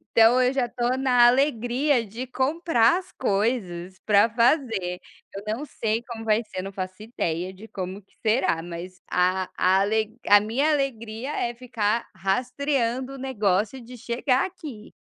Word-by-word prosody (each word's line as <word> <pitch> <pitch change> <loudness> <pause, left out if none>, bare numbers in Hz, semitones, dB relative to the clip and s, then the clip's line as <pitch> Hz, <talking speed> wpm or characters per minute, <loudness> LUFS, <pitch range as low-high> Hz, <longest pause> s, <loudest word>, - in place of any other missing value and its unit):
Então 230 +3 +6
eu 250 - +3
já 265 -3 0
tô 245 +2 -1
na 250 -2 +5
alegria 250 0 +2
de 235 +5 -7
comprar 265 -1 +2
as 370 - -14
coisas 195 -5 -1
para 210 +1 +5
fazer. 230 - +1 0.3
Eu 195 - -6
não 225 +7 -2
sei 225 -4 -2
como 225 -2 -7
vai 220 +1 +2
ser, 210 -4 -6
não 195 +1 -6
faço 185 +1 -6
ideia 185 -5 -3
de 195 +4 -12
como 190 +1 -5
que 195 - -34
será, 215 -7 +2
mas 175 +2 -8
a 185 +1 +2
a 185 +1 +4
ale 220 +3 0
a 205 0 +7
minha 250 +8 +1
alegria 255 -3 -2
é 240 -4 -2
ficar 230 -2 -1
rastreando 250 +6 -1
o - - -8
negócio 215 -3 0
de 245 +2 -11
chegar 250 +3 0
aqui. 300 - -9
230 Hz, 160 wpm, -25 LUFS, 200-255 Hz, 0.3 s, a